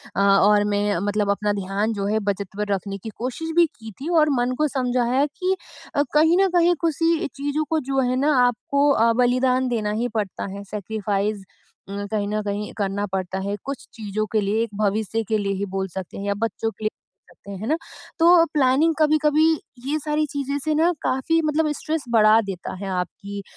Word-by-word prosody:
अ, -, -, -1 dB
और 200 Hz, +1 st, +5 dB
मैं 205 Hz, -1 st, +1 dB
मतलब 205 Hz, 0 st, 0 dB
अपना 205 Hz, +1 st, 0 dB
ध्यान 200 Hz, +3 st, -1 dB
जो 200 Hz, -1 st, -3 dB
है 215 Hz, +2 st, +1 dB
बचत 200 Hz, 0 st, -2 dB
पर 210 Hz, 0 st, -1 dB
रखने 195 Hz, +1 st, -3 dB
की 225 Hz, -, -5 dB
कोशिश 260 Hz, +7 st, -4 dB
भी 345 Hz, -, +6 dB
की 220 Hz, -1 st, -9 dB
थी 305 Hz, -, -3 dB
और 305 Hz, 0 st, +4 dB
मन 245 Hz, +1 st, +1 dB
को 305 Hz, 0 st, +2 dB
समझाया 255 Hz, 0 st, +1 dB
कि 365 Hz, +6 st, -1 dB, 0.4 s
अ, 285 Hz, -, +3 dB
कहीं 320 Hz, +4 st, +5 dB
न 390 Hz, -, +4 dB
कहीं 350 Hz, 0 st, +5 dB
किसी 330 Hz, +2 st, +1 dB
चीज़ों 285 Hz, +2 st, -1 dB
को 320 Hz, -, +2 dB
जो 270 Hz, 0 st, +1 dB
है 255 Hz, -1 st, +1 dB
ना 295 Hz, +3 st, +3 dB
आपको 280 Hz, +4 st, +1 dB
अ, 230 Hz, -3 st, +4 dB
बलिदान 255 Hz, +1 st, +2 dB
देना 215 Hz, -3 st, -1 dB
ही 245 Hz, -, +1 dB
पड़ता 205 Hz, -4 st, -2 dB
है, 200 Hz, 0 st, -7 dB
सैक्रिफाइस 205 Hz, 0 st, -2 dB, 0.5 s
अ, 200 Hz, +1 st, -4 dB
कहीं 205 Hz, -2 st, -1 dB
न 215 Hz, +1 st, -1 dB
कहीं 205 Hz, +1 st, -3 dB
करना 200 Hz, 0 st, -1 dB
पड़ता 190 Hz, 0 st, -3 dB
है 205 Hz, -, -1 dB
कुछ 275 Hz, -1 st, -6 dB
चीज़ों 215 Hz, -1 st, -3 dB
के 215 Hz, -, +2 dB
लिए 210 Hz, +3 st, +1 dB
एक 220 Hz, -3 st, -7 dB
भविष्य 215 Hz, +2 st, 0 dB
के 220 Hz, -, +1 dB
लिए 200 Hz, -1 st, -1 dB
ही 195 Hz, +1 st, -2 dB
बोल 190 Hz, 0 st, -1 dB
सकते 185 Hz, -2 st, -6 dB
हैं 200 Hz, -, -5 dB
या 200 Hz, -, +2 dB
बच्चों 225 Hz, +1 st, -2 dB
के 220 Hz, -, -13 dB
लिए 215 Hz, -, +2 dB
बोल 180 Hz, -4 st, -28 dB
सकते 200 Hz, -, -12 dB
हैं। 195 Hz, -, -6 dB
है 220 Hz, -, -4 dB
ना? 310 Hz, -, +2 dB, 0.4 s
तो 335 Hz, 0 st, +7 dB
प्लानिंग 290 Hz, +3 st, +3 dB
कभी-कभी 305 Hz, 0 st, +3 dB, 0.4 s
ये 300 Hz, -, +1 dB
सारी 300 Hz, +1 st, 0 dB
चीज़ें 280 Hz, -1 st, -2 dB
से 310 Hz, +2 st, -1 dB
ना 330 Hz, +3 st, +3 dB
काफ़ी 295 Hz, +6 st, +1 dB
मतलब 305 Hz, 0 st, +1 dB
स्ट्रेस 310 Hz, 0 st, -3 dB
बढ़ा 220 Hz, -1 st, +6 dB
देता 195 Hz, -4 st, -6 dB
है, 195 Hz, +1 st, -6 dB
आपकी 200 Hz, +2 st, -4 dB
225 Hz, 210 wpm, -23 LUFS, 205-290 Hz, 0.5 s, तो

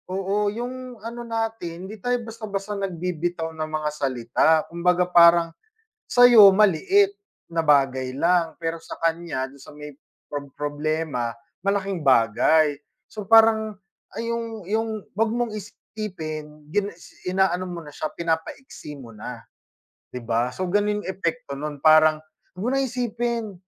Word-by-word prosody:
Oo, 195 Hz, +2 st, 0 dB
'yong 250 Hz, +3 st, -6 dB
ano 235 Hz, +1 st, -6 dB
natin 225 Hz, -7 st, -4 dB
hindi 205 Hz, +1 st, -10 dB
tayo 245 Hz, 0 st, +1 dB
basta-basta 210 Hz, -3 st, -5 dB
nagbibitaw 175 Hz, -3 st, -3 dB
ng 155 Hz, -1 st, -4 dB
mga 155 Hz, -1 st, -2 dB
salita. 125 Hz, -4 st, 0 dB, 0.2 s
Kumbaga, 180 Hz, +1 st, +1 dB
parang 170 Hz, -1 st, +6 dB, 0.6 s
sa 245 Hz, 0 st, +7 dB
'yo 225 Hz, -5 st, +9 dB
maliit 215 Hz, -, +3 dB, 0.4 s
na 165 Hz, 0 st, +1 dB
bagay 135 Hz, -4 st, +2 dB
lang, 170 Hz, 0 st, +1 dB
pero 165 Hz, 0 st, -4 dB
sa -, -, -9 dB
kaniya 165 Hz, -5 st, -1 dB
,do'n 135 Hz, +1 st, -14 dB
sa -, -, -13 dB
may 150 Hz, 0 st, -9 dB, 0.3 s
prob 145 Hz, -1 st, -6 dB
problema, 145 Hz, -4 st, -2 dB, 0.3 s
malaking 195 Hz, -2 st, -1 dB
bagay. 145 Hz, +4 st, +4 dB, 0.3 s
So 210 Hz, -2 st, -9 dB
parang 220 Hz, -2 st, +5 dB, 0.4 s
ay 230 Hz, -, -3 dB
'yong 225 Hz, -4 st, -5 dB
'yong 220 Hz, +4 st, -1 dB, 0.2 s
wag 225 Hz, +2 st, +1 dB
mong 240 Hz, -1 st, -1 dB
isipin, 160 Hz, -8 st, -7 dB
gina 205 Hz, 0 st, 0 dB
isi 180 Hz, -, -10 dB
inaano 185 Hz, -1 st, +1 dB
mo 175 Hz, -1 st, -5 dB
na 145 Hz, -, -11 dB
siya, 155 Hz, -, -3 dB
pinapaiksi 160 Hz, -, -4 dB
mo 120 Hz, -4 st, -12 dB
na, 115 Hz, +2 st, -8 dB, 0.7 s
'di 125 Hz, -, -5 dB
ba? 115 Hz, +1 st, +1 dB
So 185 Hz, +9 st, -4 dB
gano'n 205 Hz, +3 st, 0 dB
'yong -, -, -6 dB
epekto 170 Hz, -6 st, -3 dB
no'n, 150 Hz, +1 st, -5 dB
parang 155 Hz, +1 st, +6 dB, 0.4 s
wag -, -, -6 dB
mo -, -, +1 dB
na 270 Hz, -, +2 dB
isipin, 240 Hz, -3 st, -2 dB
175 Hz, 145 wpm, -24 LUFS, 155-215 Hz, 0.7 s, yo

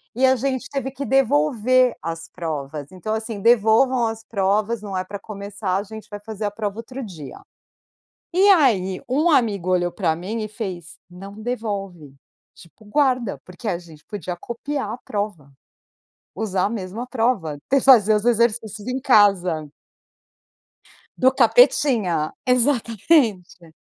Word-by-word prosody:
E 260 Hz, -, +3 dB
a 260 Hz, 0 st, +5 dB
gente 260 Hz, 0 st, -2 dB
teve 270 Hz, -1 st, -2 dB
que 275 Hz, +1 st, -6 dB
devolver 250 Hz, -, +3 dB
as 165 Hz, 0 st, -5 dB
provas, 150 Hz, -4 st, -5 dB
então 185 Hz, +4 st, -4 dB
assim 220 Hz, -1 st, -4 dB
devolvam 235 Hz, +3 st, +4 dB
as 225 Hz, 0 st, -5 dB
provas, 210 Hz, +2 st, 0 dB
não 195 Hz, -3 st, -5 dB
é 185 Hz, -, -1 dB
pra 200 Hz, +2 st, -7 dB
começar, 200 Hz, -2 st, -4 dB
a 200 Hz, -, -2 dB
gente 220 Hz, +1 st, -10 dB
vai 205 Hz, -, -7 dB
fazer 210 Hz, 0 st, -6 dB
a 205 Hz, -, -1 dB
prova 205 Hz, -1 st, -4 dB
outro 255 Hz, +3 st, -7 dB
dia. 160 Hz, -9 st, -10 dB, 0.9 s
E 380 Hz, +3 st, +4 dB
aí, 210 Hz, -, +3 dB
um 300 Hz, +7 st, +2 dB
amigo 205 Hz, -, +1 dB
olhou 175 Hz, -1 st, +1 dB
pra 170 Hz, -5 st, 0 dB
mim 205 Hz, +7 st, -4 dB
e 215 Hz, -, -5 dB
fez, 190 Hz, -6 st, -7 dB
"Não 195 Hz, +3 st, -10 dB
devolve", 195 Hz, -, -5 dB, 0.4 s
tipo, 175 Hz, +6 st, -18 dB
guarda, 255 Hz, -2 st, +1 dB
porque 185 Hz, +5 st, -11 dB
a 175 Hz, -, -1 dB
gente 160 Hz, -4 st, -16 dB
podia 180 Hz, -4 st, -5 dB
copiar 265 Hz, +8 st, -5 dB
a 240 Hz, -, -6 dB
prova, 200 Hz, -9 st, -5 dB, 0.8 s
usar 195 Hz, -4 st, -1 dB
a 205 Hz, -, 0 dB
mesma 220 Hz, +3 st, -5 dB
prova, 225 Hz, -, -1 dB
te 275 Hz, -, +4 dB
fazer 220 Hz, -6 st, +6 dB
os 210 Hz, +1 st, 0 dB
exercícios 225 Hz, -3 st, 0 dB
em 255 Hz, +1 st, -1 dB
casa. 190 Hz, -, +3 dB, 1.5 s
Do 260 Hz, -, +5 dB
capetinha, 235 Hz, -, +3 dB
exatamente. 230 Hz, -, +1 dB
215 Hz, 145 wpm, -22 LUFS, 185-245 Hz, 1.5 s, fazer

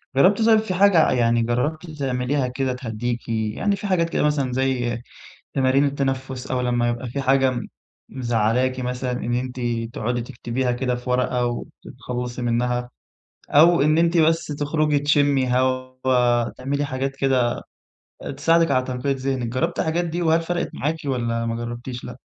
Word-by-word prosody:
جرّبتِ 190 Hz, +10 st, +4 dB
طيب 220 Hz, 0 st, +5 dB
في 215 Hz, -4 st, -3 dB
حاجة، 185 Hz, -3 st, +5 dB
يعني 120 Hz, -1 st, +2 dB
جرّبتِ 150 Hz, +8 st, -1 dB
تعمليها 135 Hz, -2 st, -1 dB
كده 130 Hz, +1 st, -2 dB
تهدّيكِ، 120 Hz, -1 st, -4 dB
يعني 110 Hz, -, 0 dB
في 200 Hz, +1 st, -5 dB
حاجات 170 Hz, -3 st, +1 dB
كده -, -, 0 dB
مثلًا 145 Hz, -3 st, +1 dB
زي 125 Hz, -2 st, -1 dB, 0.5 s
تمارين 135 Hz, +1 st, +3 dB
التنفُّس 135 Hz, -2 st, -2 dB
أو 130 Hz, -1 st, 0 dB
لمّا 120 Hz, -1 st, +1 dB
يبقى 120 Hz, +1 st, -3 dB
في 140 Hz, +4 st, -3 dB
حاجة 135 Hz, -1 st, +2 dB, 0.5 s
مزعّلاكِ 125 Hz, +1 st, 0 dB
مثلًا 125 Hz, 0 st, -2 dB
إن 120 Hz, -1 st, -2 dB
أنتِ 125 Hz, +1 st, -3 dB, 0.3 s
تقعُدي 120 Hz, +2 st, -2 dB
تكتبيها 125 Hz, 0 st, -2 dB
كده 125 Hz, 0 st, -1 dB
في 125 Hz, +1 st, -7 dB
ورقة 125 Hz, 0 st, +1 dB
وتتخلّصي 125 Hz, +1 st, -5 dB
منها، 120 Hz, +1 st, 0 dB, 0.6 s
أو 165 Hz, +2 st, +6 dB
إن 155 Hz, +2 st, +3 dB
أنتِ 170 Hz, +1 st, +3 dB
بس 165 Hz, +1 st, +3 dB
تخرُجي 150 Hz, 0 st, 0 dB
تشمّي 145 Hz, -2 st, +2 dB
هوا، 130 Hz, -2 st, +1 dB
تعملي 140 Hz, +3 st, -2 dB
حاجات 135 Hz, 0 st, -3 dB
كده 130 Hz, -3 st, +1 dB, 0.7 s
آآ -, -, -5 dB
تساعدِك 165 Hz, +4 st, +3 dB
على 130 Hz, 0 st, +2 dB
تنقية 130 Hz, +2 st, -2 dB
ذهنِك، 130 Hz, -2 st, -2 dB
جرّبتِ 160 Hz, +9 st, -1 dB
الحاجات 165 Hz, +2 st, 0 dB
دي 170 Hz, +1 st, -3 dB
وهل 165 Hz, 0 st, +3 dB
فرقِت 175 Hz, +1 st, -2 dB
معاكِ 155 Hz, +4 st, -1 dB
والّا 120 Hz, -4 st, -1 dB
ما 115 Hz, 0 st, -2 dB
جرّبتيش، 120 Hz, +1 st, -6 dB
لأ؟ 125 Hz, -, -7 dB
130 Hz, 155 wpm, -22 LUFS, 125-145 Hz, 0.7 s, أو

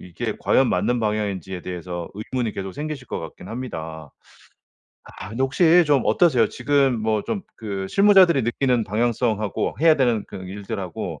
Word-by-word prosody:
이게 105 Hz, +5 st, -5 dB
과연 130 Hz, -1 st, +3 dB
맞는 125 Hz, 0 st, +1 dB
방향인지에 100 Hz, -4 st, -2 dB
대해서 90 Hz, -1 st, -6 dB
의문이 115 Hz, +2 st, -3 dB
계속 95 Hz, -1 st, -5 dB
생기실 150 Hz, -3 st, -6 dB
것 -, -, -3 dB
같긴 80 Hz, +3 st, -10 dB
합니다. 80 Hz, -, -6 dB, 0.9 s
아 -, -, -10 dB
근데 115 Hz, +5 st, -3 dB
혹시 170 Hz, +5 st, +4 dB
좀 145 Hz, -4 st, +3 dB
어떠세요? 120 Hz, -1 st, +3 dB
지금 135 Hz, -2 st, +1 dB
뭐 110 Hz, -1 st, 0 dB
좀 200 Hz, -4 st, -3 dB
그 100 Hz, -3 st, -4 dB
실무자들이 190 Hz, -, +5 dB
느끼는 120 Hz, +1 st, +1 dB
방향성하고 110 Hz, 0 st, -1 dB
해야 160 Hz, 0 st, +6 dB
되는 120 Hz, -5 st, +1 dB
그 -, -, -8 dB
일들하고 95 Hz, -1 st, -6 dB
115 Hz, 350 characters per minute, -22 LUFS, 95-135 Hz, 0.9 s, 해야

